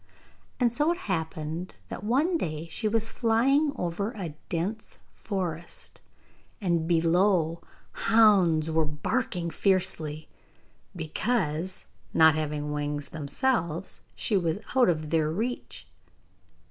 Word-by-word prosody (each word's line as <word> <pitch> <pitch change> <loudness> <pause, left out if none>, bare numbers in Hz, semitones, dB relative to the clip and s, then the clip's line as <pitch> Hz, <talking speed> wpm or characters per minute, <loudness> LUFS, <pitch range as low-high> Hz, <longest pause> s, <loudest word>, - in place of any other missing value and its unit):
And 245 -2 +3
so 295 +7 +2
it 345 - -1
happened 160 - -3
that - - -6
one 280 - +2
day 155 - -2
she 220 - -1
was 225 +1 +1
flying 260 +7 +2
over 190 +5 -2
a 180 -8 -5 0.2
dense 190 +6 -3 0.2
forest, 175 -5 -5 0.6
and 170 -5 0
below 170 0 +2 0.3
hounds 190 -9 +4
were 160 0 +3
barking 170 +4 -2
fiercely, 160 -6 0 0.7
because, 175 0 -1 0.3
not 160 -1 +7
having 150 -1 -2
wings 145 -1 -3
themselves, 170 - -1
she 215 - 0
was 170 -2 +1 0.2
out 255 -6 +5
of 155 -3 -1
their 160 -2 +2
reach. 225 +10 -4
175 Hz, 110 wpm, -27 LUFS, 160-220 Hz, 0.7 s, not